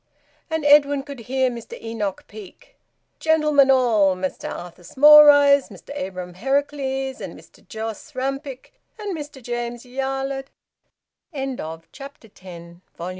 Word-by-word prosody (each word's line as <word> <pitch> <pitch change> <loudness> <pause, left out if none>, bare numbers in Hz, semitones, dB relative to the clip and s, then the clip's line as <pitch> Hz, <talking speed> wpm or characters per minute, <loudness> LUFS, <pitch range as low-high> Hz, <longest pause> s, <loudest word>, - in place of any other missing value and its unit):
And 320 -2 -2
Edwin 285 -1 +5
could 280 -2 -9
hear 260 +2 0
Mr 235 -1 -9
Enoch 215 -4 -4
Peake: 210 -3 -14 0.4
"Gentlemen 305 -3 +3
all, 225 -8 +3
Mester 185 0 -5
Arthur 175 0 -8
Smallrice, 285 - +7
Mester - - -11
Abraham 185 -7 -6
Harracles, 270 +3 -2
Mester - - -11
Jos 220 +6 -7
Rampick, 270 - -5 0.2
and 415 -3 -5
Mester 295 -4 -8
James 240 0 -5
Yarlett 270 +1 -4 0.4
" - - -62
VOLUME 270 -1 -3
ONE, 160 +1 -7
CHAPTER 275 -4 -12
ELEVEN. 170 -3 -13
265 Hz, 125 wpm, -22 LUFS, 220-285 Hz, 0.4 s, Smallrice